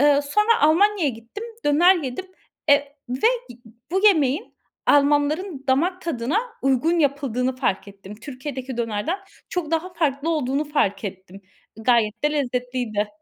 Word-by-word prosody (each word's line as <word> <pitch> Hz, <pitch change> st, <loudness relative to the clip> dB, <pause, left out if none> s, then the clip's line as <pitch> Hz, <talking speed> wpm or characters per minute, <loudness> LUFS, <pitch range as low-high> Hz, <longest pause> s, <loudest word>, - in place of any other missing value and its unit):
Iıı, 290 Hz, 0 st, +5 dB
sonra 420 Hz, +10 st, +2 dB
Almanya'ya 370 Hz, 0 st, +4 dB
gittim, 230 Hz, -, -9 dB, 0.2 s
döner 335 Hz, +6 st, +5 dB
yedim, 285 Hz, +4 st, -5 dB, 0.4 s
e 285 Hz, -, +9 dB, 0.3 s
ve 255 Hz, +2 st, -4 dB, 0.7 s
bu 385 Hz, +3 st, +3 dB
yemeğin 295 Hz, -8 st, +2 dB, 0.3 s
Almanların 290 Hz, +2 st, +2 dB
damak 350 Hz, +8 st, +1 dB
tadına 290 Hz, -, -1 dB, 0.2 s
uygun 270 Hz, +6 st, +2 dB
yapıldığını 265 Hz, -4 st, 0 dB
fark 205 Hz, -6 st, -1 dB
ettim. 200 Hz, 0 st, -11 dB
Türkiye'deki 260 Hz, +2 st, -7 dB
dönerden 235 Hz, -, -2 dB, 0.3 s
çok 345 Hz, -4 st, -3 dB
daha 330 Hz, +3 st, -1 dB
farklı 310 Hz, -2 st, 0 dB
olduğunu 290 Hz, -1 st, 0 dB
fark 220 Hz, -9 st, 0 dB
ettim. 190 Hz, 0 st, -8 dB, 0.4 s
Gayet 230 Hz, +1 st, +1 dB
de 300 Hz, -, +3 dB
lezzetliydi. 245 Hz, -6 st, -2 dB
280 Hz, 125 wpm, -23 LUFS, 245-325 Hz, 0.7 s, e